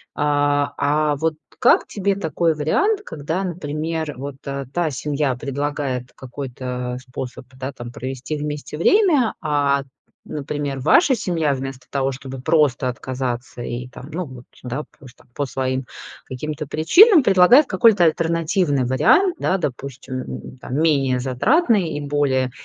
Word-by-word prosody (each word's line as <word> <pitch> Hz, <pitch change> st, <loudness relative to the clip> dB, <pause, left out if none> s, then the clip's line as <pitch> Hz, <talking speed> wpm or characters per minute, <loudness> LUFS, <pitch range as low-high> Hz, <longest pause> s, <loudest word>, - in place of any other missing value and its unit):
а 145 Hz, -1 st, +1 dB
а 150 Hz, +1 st, +1 dB
вот 160 Hz, +2 st, 0 dB, 0.3 s
как -, -, +5 dB
тебе 200 Hz, -1 st, -1 dB
такой 165 Hz, -3 st, 0 dB
вариант, 390 Hz, -, +1 dB
когда, 160 Hz, +6 st, -3 dB
например, 160 Hz, -2 st, -3 dB
вот 140 Hz, +1 st, -6 dB
та 140 Hz, +4 st, -3 dB
семья 140 Hz, 0 st, -1 dB
предлагает 140 Hz, -1 st, -3 dB
какой-то 125 Hz, -1 st, -5 dB
способ, 125 Hz, 0 st, -7 dB
да, 130 Hz, +1 st, -5 dB
там 120 Hz, -3 st, -9 dB
провести 130 Hz, +4 st, -5 dB
вместе 150 Hz, 0 st, -5 dB
время, 300 Hz, -, +4 dB
а, 145 Hz, -3 st, +1 dB, 0.4 s
например, 145 Hz, -1 st, -4 dB
ваша 265 Hz, -, +4 dB
семья, 170 Hz, -9 st, 0 dB
вместо 135 Hz, -1 st, -6 dB
того 135 Hz, -1 st, -1 dB
чтобы 135 Hz, 0 st, -8 dB
просто 140 Hz, -4 st, +2 dB
отказаться 125 Hz, 0 st, -4 dB
и 120 Hz, +1 st, -5 dB
там, 130 Hz, +2 st, -11 dB
ну 175 Hz, +3 st, -3 dB
вот, 130 Hz, -3 st, -11 dB, 0.2 s
да, 125 Hz, +4 st, -4 dB, 0.2 s
по 140 Hz, -, -15 dB
с 120 Hz, -, -15 dB
там -, -, -23 dB
по 145 Hz, -, -2 dB
своим 130 Hz, 0 st, -2 dB, 0.4 s
каким-то 150 Hz, +4 st, -5 dB
причинам, 310 Hz, -, +6 dB
предлагает 200 Hz, +8 st, +6 dB
какой-то 195 Hz, -1 st, +4 dB
альтернативный 165 Hz, -3 st, +1 dB
вариант, 255 Hz, -, +3 dB
да. 190 Hz, -, +1 dB
Допустим, 135 Hz, -4 st, -5 dB
м, 130 Hz, -, -8 dB
там 125 Hz, -, -5 dB
менее 135 Hz, -5 st, +2 dB
затратный 195 Hz, -, +2 dB
и -, -, -4 dB
более, 140 Hz, -3 st, 0 dB
145 Hz, 140 wpm, -21 LUFS, 130-165 Hz, 0.4 s, причинам